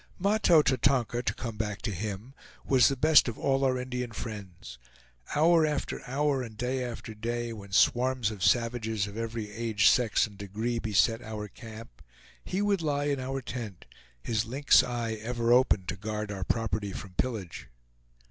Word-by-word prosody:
Mahto 195 Hz, -5 st, +4 dB
Tatonka, 125 Hz, -3 st, +1 dB
to -, -, -1 dB
come 115 Hz, -3 st, -6 dB
back 105 Hz, -2 st, -3 dB
to -, -, -1 dB
him, 105 Hz, +6 st, -5 dB, 0.3 s
was 130 Hz, -4 st, +5 dB
the 135 Hz, -, +1 dB
best 150 Hz, +2 st, +5 dB
of 120 Hz, -, -4 dB
all 135 Hz, -1 st, +1 dB
our 130 Hz, -1 st, +2 dB
Indian 125 Hz, -1 st, -4 dB
friends. 95 Hz, -, -8 dB, 0.6 s
Hour 165 Hz, +2 st, +5 dB
after 150 Hz, -2 st, -2 dB
hour 140 Hz, +1 st, 0 dB
and 115 Hz, -4 st, -8 dB
day 125 Hz, +2 st, -1 dB
after 115 Hz, -2 st, -6 dB
day, 120 Hz, +2 st, -3 dB
when 100 Hz, -3 st, -11 dB
swarms 125 Hz, +2 st, +3 dB
of 100 Hz, -4 st, -6 dB
savages 115 Hz, -3 st, +1 dB
of 100 Hz, 0 st, -9 dB
every 115 Hz, -2 st, -4 dB
age, 110 Hz, -1 st, +1 dB
sex, 120 Hz, -4 st, +4 dB
and 105 Hz, -2 st, -13 dB
degree 110 Hz, +4 st, -3 dB
beset 115 Hz, +2 st, +2 dB
our 105 Hz, -1 st, -6 dB
camp, 110 Hz, -, -12 dB, 0.4 s
he 190 Hz, +3 st, -2 dB
would 200 Hz, -3 st, +1 dB
lie 145 Hz, -2 st, 0 dB
in 140 Hz, -2 st, 0 dB
our 135 Hz, +1 st, -4 dB
tent, 110 Hz, -7 st, -7 dB, 0.4 s
his 110 Hz, -2 st, 0 dB
lynx 135 Hz, +5 st, +4 dB
eye 120 Hz, -2 st, -3 dB
ever 120 Hz, +1 st, +1 dB
open 125 Hz, -7 st, +3 dB
to -, -, -3 dB
guard 105 Hz, +1 st, -4 dB
our 95 Hz, -2 st, -4 dB
property 110 Hz, -3 st, -1 dB
from 95 Hz, -, -8 dB
pillage. 105 Hz, -5 st, -3 dB
115 Hz, 170 wpm, -29 LUFS, 105-130 Hz, 0.6 s, was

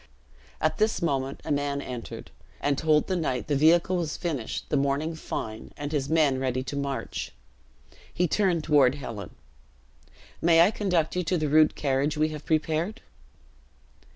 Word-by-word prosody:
At 155 Hz, -, 0 dB
this 215 Hz, +1 st, +2 dB
moment 135 Hz, -5 st, -1 dB
a -, -, -3 dB
man 145 Hz, 0 st, 0 dB
entered 125 Hz, -4 st, -7 dB, 0.3 s
and 145 Hz, -1 st, +1 dB
told 150 Hz, +1 st, +2 dB
the 185 Hz, -, -1 dB
knight 155 Hz, -7 st, -1 dB
the 145 Hz, -, 0 dB
vehicle 170 Hz, +5 st, +4 dB
was 165 Hz, -3 st, -2 dB
finished, 145 Hz, -10 st, -3 dB
the -, -, +1 dB
morning 140 Hz, +3 st, 0 dB
fine, 110 Hz, -8 st, -6 dB
and 145 Hz, 0 st, -5 dB
his 145 Hz, -3 st, -1 dB
men 150 Hz, -5 st, +3 dB
ready 130 Hz, -1 st, -1 dB
to 140 Hz, -, -6 dB
march. 140 Hz, -1 st, -4 dB, 0.8 s
He 180 Hz, -, +1 dB
turned 180 Hz, -3 st, +1 dB
toward 140 Hz, -4 st, +4 dB
Helen: 115 Hz, -7 st, -7 dB, 1.1 s
"May 165 Hz, 0 st, +5 dB
I 180 Hz, +5 st, +6 dB
conduct 180 Hz, -8 st, 0 dB
you 180 Hz, -, 0 dB
to 180 Hz, +2 st, +1 dB
the 155 Hz, -2 st, -1 dB
rude 155 Hz, +1 st, +5 dB
carriage 140 Hz, +1 st, 0 dB
we 155 Hz, +1 st, +2 dB
have 150 Hz, -1 st, -8 dB
prepared?" 160 Hz, +7 st, 0 dB
150 Hz, 160 wpm, -27 LUFS, 140-165 Hz, 1.1 s, I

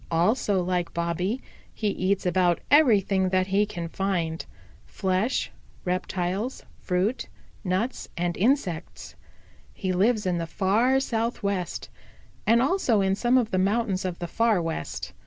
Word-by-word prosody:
Also, 190 Hz, +3 st, +2 dB
like 180 Hz, -1 st, -2 dB
Bobby, 175 Hz, +8 st, -1 dB, 0.3 s
he 215 Hz, -, 0 dB
eats 190 Hz, 0 st, 0 dB
about 180 Hz, -1 st, +2 dB
everything 200 Hz, -10 st, +4 dB
that 185 Hz, 0 st, +2 dB
he 200 Hz, +2 st, +2 dB
can 170 Hz, -4 st, -5 dB
find 170 Hz, -3 st, -2 dB, 0.4 s
flesh, 190 Hz, +5 st, -1 dB, 0.3 s
reptiles, 185 Hz, +5 st, -2 dB, 0.2 s
fruit, 200 Hz, +7 st, -1 dB, 0.4 s
nuts 195 Hz, +6 st, -2 dB
and 175 Hz, 0 st, -1 dB
insects. 200 Hz, -, -1 dB, 0.6 s
He 185 Hz, -1 st, -2 dB
lives 210 Hz, +3 st, +2 dB
in 180 Hz, -2 st, 0 dB
the 165 Hz, -, -3 dB
Far 220 Hz, +9 st, +2 dB
Southwest, 220 Hz, -7 st, -2 dB, 0.6 s
and 235 Hz, +2 st, +5 dB
also 265 Hz, -, +2 dB
in 190 Hz, 0 st, +2 dB
some 240 Hz, +6 st, +2 dB
of 235 Hz, -3 st, +1 dB
the 185 Hz, -, +1 dB
mountains 200 Hz, 0 st, +1 dB
of 180 Hz, -2 st, -3 dB
the 175 Hz, -, -4 dB
Far 225 Hz, +1 st, +2 dB
West. 165 Hz, -, -4 dB
190 Hz, 135 wpm, -26 LUFS, 180-225 Hz, 0.6 s, and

